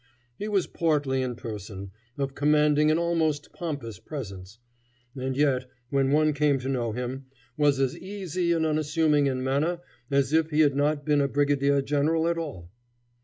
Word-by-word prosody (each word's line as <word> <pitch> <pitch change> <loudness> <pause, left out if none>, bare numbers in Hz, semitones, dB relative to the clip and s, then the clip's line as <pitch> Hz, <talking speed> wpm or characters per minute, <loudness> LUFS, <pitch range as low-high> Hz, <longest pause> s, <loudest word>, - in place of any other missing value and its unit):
He 210 - -3
was 200 -3 +1
portly 145 -5 0
in 125 -2 -2
person, 100 -4 -7 0.3
of 135 -1 -2
commanding 150 +1 +3
and 155 +2 +3
almost 160 -4 0
pompous 140 - -5
presence, 100 -8 -8 0.6
and 130 0 -3
yet, 135 -3 +2 0.2
when 135 -1 +2
one 155 +1 +3
came 145 -1 +2
to 130 - -4
know 120 -4 -1
him, 125 +3 -5 0.3
was 145 -3 +3
as 135 -2 +1
easy 185 -3 -3
and 165 -1 +2
unassuming 155 -1 +2
in 130 -1 -1
manner 145 +6 0 0.3
as 140 0 +1
if 160 0 +3
he 155 0 +3
had 145 -3 +4
not 145 +1 +1
been 150 -2 +3
a 140 - +2
brigadier 140 0 +2
general 155 +4 +1
at 170 0 0
all. 90 - -7
145 Hz, 170 wpm, -26 LUFS, 130-155 Hz, 0.6 s, had